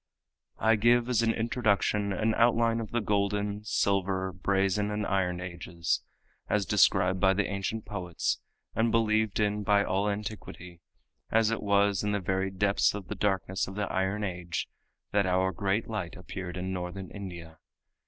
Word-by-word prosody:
I 110 0 +3
give 120 +2 +4
as 120 -3 +3
an 115 -1 +3
introduction 105 -3 +1
an 110 +4 +1
outline 115 0 +3
of 110 -2 -5
the 120 - 0
golden, 105 0 0
silver, 95 -3 0
brazen 95 +2 +1
and 105 0 -2
iron 90 -2 0
ages, 85 -2 -3 0.5
as 105 -2 +1
described 95 -2 +3
by 95 +1 +4
the 105 0 +1
ancient 100 +3 -3
poets 90 -2 -2 0.3
and 115 +2 +2
believed 110 -2 +2
in 105 0 +1
by 100 0 +3
all 100 +2 0
antiquity, 100 -4 -6 0.5
as 110 0 +3
it 115 - -1
was 100 -1 +2
in 105 0 0
the 100 - +1
very 95 +1 -1
depths 100 +1 +2
of 100 -5 -7
the - - -3
darkness 95 -2 0
of 95 - -8
the 105 0 -1
iron 95 +3 0
age 90 -3 -3 0.4
that 100 -2 +2
our 95 +1 +2
great 100 +4 -1
light 105 -6 -4
appeared 95 -1 -6
in 95 +1 -3
Northern 90 +1 -5
India. 85 -5 -8
100 Hz, 165 wpm, -29 LUFS, 95-105 Hz, 0.5 s, give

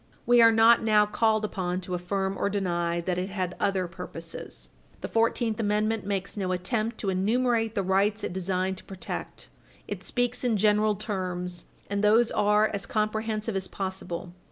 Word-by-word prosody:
We 240 0 +6
are 230 0 +8
not 225 +1 +6
now 215 -1 +4
called 215 0 +1
upon 185 -3 -2
to 180 0 -6
affirm 190 +2 -1
or - - 0
deny 175 -4 -1
that 180 +1 -1
it 185 +2 -3
had 185 -3 -2
other 190 -2 +1
purposes. 170 -1 -9 0.3
The - - -3
Fourteenth 230 -1 +1
Amendment 215 -1 0
makes 195 -2 -2
no 190 -3 -2
attempt 215 +5 -1
to 195 - 0
enumerate 225 +3 +1
the 200 - +1
rights 200 +3 +1
it - - -3
designed 190 0 -1
to - - -9
protect. 190 -2 -7 0.4
It - - -5
speaks 245 0 -1
in 235 -4 +2
general 210 +1 +3
terms, 180 -4 -4 0.2
and 200 0 -2
those 225 +3 +4
are 210 +1 +3
as 200 - -4
comprehensive 215 0 -1
as 190 -1 -2
possible. 185 -2 -5
200 Hz, 170 wpm, -27 LUFS, 185-220 Hz, 0.4 s, are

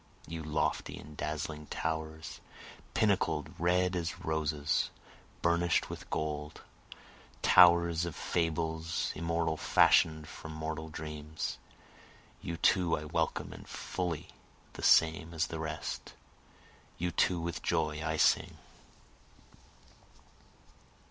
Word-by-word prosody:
You 80 +1 -5
lofty 75 0 -1
and 75 +1 -11
dazzling 75 0 -4
towers, 80 0 -4 0.6
pinnacled, 95 -9 +1
red 90 +2 +2
as 85 -1 -3
roses, 75 -2 0 0.5
burnish'd 85 0 +2
with - - -8
gold! 75 -1 -3 0.8
Towers 85 -2 +6
of 85 -4 -5
fables 80 0 -1
immortal 85 -1 -1
fashion'd 80 0 +4
from 80 - -9
mortal 80 0 -4
dreams! 75 0 -5 0.8
You 85 - -4
too 90 -1 +3
I 75 - -6
welcome 75 - -1
and - - -12
fully 85 -4 -3 0.4
the - - -8
same 80 +1 +4
as 80 +1 +2
the 80 0 -6
rest! 80 -3 -4 0.8
You 90 +1 -1
too 90 +1 +2
with 85 +1 -3
joy 75 -1 0
I 80 0 -1
sing. - - +3
80 Hz, 105 wpm, -32 LUFS, 75-85 Hz, 0.8 s, Towers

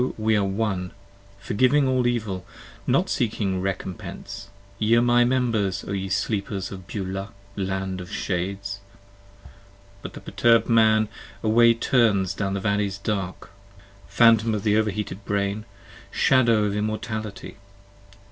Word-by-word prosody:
we 110 0 +2
are 105 - +2
One; 95 -2 -2 0.4
forgiving 130 +8 +2
all 130 -1 +2
Evil; 105 -7 -2 0.4
Not 155 +9 +2
seeking 105 - -1
recompense; 95 +1 -5 0.3
Ye 110 +2 +3
are 120 - +5
my 120 0 +4
members 115 -7 0
O - - -4
ye 95 -1 -3
sleepers 100 -1 -2
of 95 -2 -9
Beulah, 95 -3 -4 0.3
land 95 -1 -3
of 90 - -10
shades! 100 +2 -3 1.2
But - - -8
the - - -8
perturbed 115 -1 +2
Man 110 -2 +4 0.4
away 115 +1 +5
turns 110 -6 +2
down 100 -1 -2
the - - -1
valleys 100 -1 0
dark; 100 -2 -4 0.6
Phantom 115 -1 +4
of 100 - -3
the 105 -1 +2
over 110 0 +2
heated 105 0 -5
brain! 100 +1 -2 0.4
shadow 115 -5 +3
of 105 -1 -1
immortality! 110 -1 -4
105 Hz, 130 wpm, -24 LUFS, 95-115 Hz, 1.2 s, are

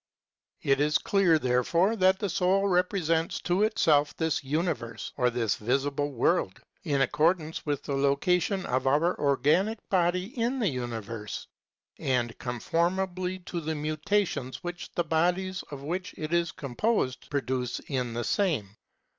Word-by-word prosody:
It 135 0 +3
is 150 0 +3
clear, 190 -5 +3
therefore, 155 - +2
that 190 0 +4
the 205 - -2
soul 195 +2 +2
re 180 -2 +4
presents 165 -3 -1
to 180 +3 +1
itself 155 -9 +3
this 160 -3 0
universe, 140 -6 -2
or 125 -2 +2
this 115 -3 0
visible 140 +5 0
world, 115 -6 +1 0.2
in 145 -5 +1
accordance 160 +3 0
with 145 -2 -1
the 140 - -3
location 175 +8 +1
of 130 +1 0
our 155 +6 +3
organic 150 - +2
body 180 +3 +1
in 240 +2 0
the 220 -7 +1
universe, 115 -4 -5 0.5
and 120 -3 0
conformably 180 +8 -1
to 175 -1 -5
the 160 0 -2
mutations 155 -2 -1
which 175 0 -6
the 175 - +1
bodies 180 +4 0
of 140 -2 -8
which 180 +6 -4
it 155 +1 -4
is 170 -1 +2
composed 140 - -1
produce 130 -3 -1
in 125 -4 -3
the 120 - -1
same. 140 - 0
155 Hz, 145 wpm, -28 LUFS, 135-180 Hz, 0.5 s, that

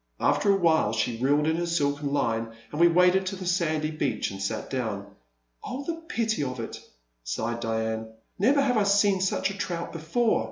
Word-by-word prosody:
After 145 +8 +3
a 195 - +4
while 160 - +3
she 115 +1 -1
reeled 145 +4 +2
in 160 +1 +1
her 175 0 -1
silken 145 -3 0
line, 115 -5 0 0.2
and 150 - -2
we 170 - +8
waded 180 +2 +4
to 195 - -2
the 185 -1 -7
sandy 160 -4 0
beach 130 -11 -1
and 95 0 -7
sat 100 - -3
down. 110 -7 -2 0.6
Oh, 270 +3 -5
the 330 -1 -4
pity 220 - 0
of 130 -2 -4
it, 115 - -6 0.2
' - - -44
' - - -48
sighed 110 - -3
Diane; 110 -1 -2 0.3
never 275 +8 +4
have 250 -4 +2
I 210 - +4
seen 200 -1 +3
such 190 +1 0
a - - -6
trout 170 -4 -4
before. 170 +9 +1
155 Hz, 205 wpm, -27 LUFS, 115-190 Hz, 0.6 s, we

